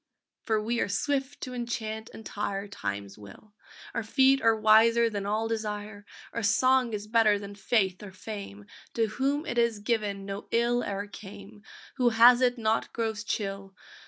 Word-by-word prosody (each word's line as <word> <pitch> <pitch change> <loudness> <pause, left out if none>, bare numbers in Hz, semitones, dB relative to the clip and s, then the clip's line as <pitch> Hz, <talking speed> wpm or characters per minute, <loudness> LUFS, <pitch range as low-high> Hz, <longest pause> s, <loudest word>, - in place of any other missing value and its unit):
For 220 -1 +2
we 235 +3 -1
are - - 0
swift 275 +6 -2
to 255 - -5
enchant 225 -2 -4
and 225 - -11
tire 200 -1 -3
Time's 100 - -6
will! 105 - -14 0.4
Our - - -1
feet 265 +4 +3
are 225 0 +4
wiser 225 +2 +5
than 200 -1 -3
all 215 +2 0
desire, 210 -2 -5 0.3
Our 230 - -2
song 250 +3 +3
is 205 0 -4
better 215 -1 +3
than 200 0 -8
faith 195 -2 0
or 205 - -8
fame; 190 - -8 0.3
To 230 - +2
whom 275 +7 -1
it 240 - -1
is 235 -2 +2
given 205 -2 -2
no 200 +1 -6
ill 240 +1 +1
e'er 200 0 -3
came, 205 0 -12 0.4
Who 245 -2 +4
has 240 +2 +6
it 250 0 +2
not 220 -1 0
grows 220 -2 -2
chill! 195 -3 -4
215 Hz, 170 wpm, -28 LUFS, 200-235 Hz, 0.4 s, has